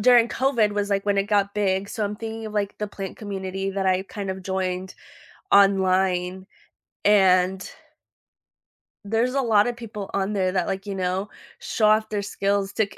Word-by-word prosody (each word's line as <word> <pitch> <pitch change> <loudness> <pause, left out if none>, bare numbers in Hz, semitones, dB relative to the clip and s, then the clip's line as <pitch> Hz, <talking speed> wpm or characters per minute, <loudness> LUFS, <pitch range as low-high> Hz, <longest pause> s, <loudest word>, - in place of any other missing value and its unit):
during 240 +1 +6
COVID 240 -6 +1
was, 205 0 -1
like, 195 -1 0
when 200 -1 +1
it 195 - +2
got 200 -1 +1
big, 195 -1 0
so 215 +2 -4
I'm 205 0 -2
thinking 225 0 -6
of 215 - -8
like 200 -1 -2
the 210 - -2
plant 195 -2 -7
community, 195 -2 -4
that 195 0 -2
I 185 0 +2
kind 200 0 -6
of 190 0 -6
joined 185 0 -3 0.6
online 190 -2 +3 0.6
and 190 -2 +4 1.4
There's 225 +4 0
a 275 - +1
lotta 225 -1 +3
people 215 -4 -8
on 200 +1 -1
there 185 -2 +1
that, 185 -2 0
like, 195 +1 -3
you 200 - -4
know, 190 +2 -2 0.3
show 215 - +1
off 215 0 +3
their 210 -1 -2
skills 200 0 -1
to 220 - +2
k 200 - -16
200 Hz, 180 wpm, -24 LUFS, 190-210 Hz, 1.4 s, during